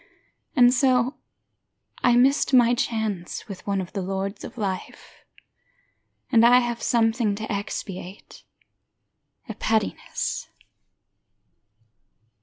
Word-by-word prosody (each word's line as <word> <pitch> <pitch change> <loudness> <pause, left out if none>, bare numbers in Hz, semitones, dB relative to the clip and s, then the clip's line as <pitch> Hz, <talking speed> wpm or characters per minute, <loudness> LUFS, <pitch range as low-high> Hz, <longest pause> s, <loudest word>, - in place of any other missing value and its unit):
And 245 -2 +6
so, 255 0 +2 0.9
I 245 -1 +5
missed 265 +2 +3
my 240 -1 +5
chance 220 -8 -3
with 195 -2 -10
one 200 -1 0
of 185 -1 -6
the 200 - -3
lords 195 +2 -4
Of - - -9
life. 195 -4 -6 1.1
And 230 -1 +5
I 245 +1 +7
have 240 -1 -1
something 225 -2 +1
to 220 +2 -6
expiate: 200 -2 -6 1.1
A - - -5
pettiness. 220 -2 -2
225 Hz, 100 wpm, -24 LUFS, 200-245 Hz, 1.1 s, I